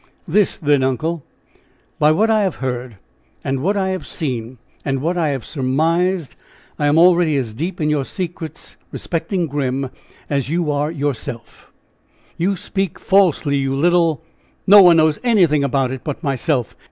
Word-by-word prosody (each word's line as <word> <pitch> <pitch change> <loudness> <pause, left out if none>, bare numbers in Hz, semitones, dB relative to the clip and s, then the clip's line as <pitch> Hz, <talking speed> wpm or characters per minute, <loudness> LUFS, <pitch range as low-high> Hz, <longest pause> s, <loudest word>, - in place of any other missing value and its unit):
"This, 200 +4 +2
then, 145 -3 +2
uncle: 145 +5 -1 0.8
By 150 +1 +5
what 215 +8 +2
I 215 -1 +3
have 190 -4 0
heard, 125 -4 -5 0.5
and 135 0 -1
what 195 +9 0
I 190 -1 0
have 185 -1 -4
seen, 125 -6 -4 0.3
and 135 -1 -1
what 165 +6 -1
I 170 -3 +1
have 135 -6 -3
surmised, 165 +6 0 0.4
I 145 - +2
am 145 +2 +3
already 170 -3 +4
as 120 -5 -3
deep 165 - -4
in 150 - 0
your 150 -2 +1
secrets 165 -1 -6
respecting 175 +1 -2
Grim 135 -3 -2 0.4
as 140 -2 -1
you 165 -1 0
are 145 +1 0
yourself." 140 -6 -5 0.6
"You 190 +4 0
speak 195 0 -3
falsely, 170 -7 +2
you 135 -1 -1
little! 165 +1 +2 0.4
No 205 +1 +9
one 175 -3 +7
knows 155 -2 +3
anything 175 - +3
about 135 -1 0
it 130 -1 -6
but 150 +3 -5
myself!" 135 -3 -1
155 Hz, 160 wpm, -19 LUFS, 135-175 Hz, 0.8 s, No